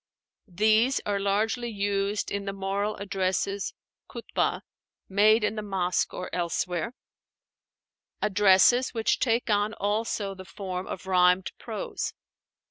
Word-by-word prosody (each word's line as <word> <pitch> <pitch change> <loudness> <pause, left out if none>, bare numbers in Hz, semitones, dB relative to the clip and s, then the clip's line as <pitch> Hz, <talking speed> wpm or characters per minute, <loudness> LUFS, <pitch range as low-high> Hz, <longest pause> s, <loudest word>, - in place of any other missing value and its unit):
These 215 +7 +3
are 200 -1 0
largely 220 +5 0
used 200 -1 -1
in 200 0 -3
the 195 - -3
moral 195 +2 -2
addresses 195 0 -2 0.3
(Khútbah) - - -2 0.5
made 210 +3 +4
in 210 +1 0
the 215 - -3
mosque 190 -3 0
or 180 - -6
elsewhere, 180 +5 -2 1.2
addresses 210 +5 +4
which 225 -1 +1
take 230 -2 +1
on 205 +1 +1
also 205 -1 -1
the 190 -1 -10
form 185 -1 -6
of 190 - -6
rhymed 180 0 +3
prose. - - -4
200 Hz, 120 wpm, -27 LUFS, 190-215 Hz, 1.2 s, made